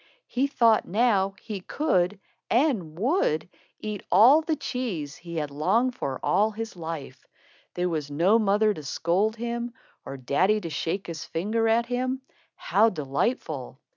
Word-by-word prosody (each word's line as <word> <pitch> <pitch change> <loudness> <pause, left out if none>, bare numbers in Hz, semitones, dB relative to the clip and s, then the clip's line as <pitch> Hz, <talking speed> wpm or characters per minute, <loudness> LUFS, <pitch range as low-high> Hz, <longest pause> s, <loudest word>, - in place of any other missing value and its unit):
He 260 +3 0
thought 230 -5 +3
now 195 -1 +2
he 210 -4 -6
could, 190 - 0 0.3
and 225 - +1
would, 200 - +1 0.3
eat 210 -2 -5
all 240 - +7
the 315 0 -1
cheese 230 - -4
he 170 0 -9
had 150 -3 -2
longed 205 - +1
for 135 - -4
all 210 +2 +3
his 225 0 -6
life. 165 -4 -7 0.5
There 180 0 0
was 155 -4 -3
no 175 +10 +3
mother 210 0 +3
to 155 - -8
scold 180 +9 0
him, 235 +1 -4 0.3
or 135 - -7
daddy 180 - +2
to 165 -4 -6
shake 165 +5 -2
his 165 -3 -6
finger 220 +7 -1
at 230 +1 +3
him. 255 +2 -2 0.3
How 220 +3 +3
delightful! 150 - -2
205 Hz, 150 wpm, -26 LUFS, 165-235 Hz, 0.5 s, all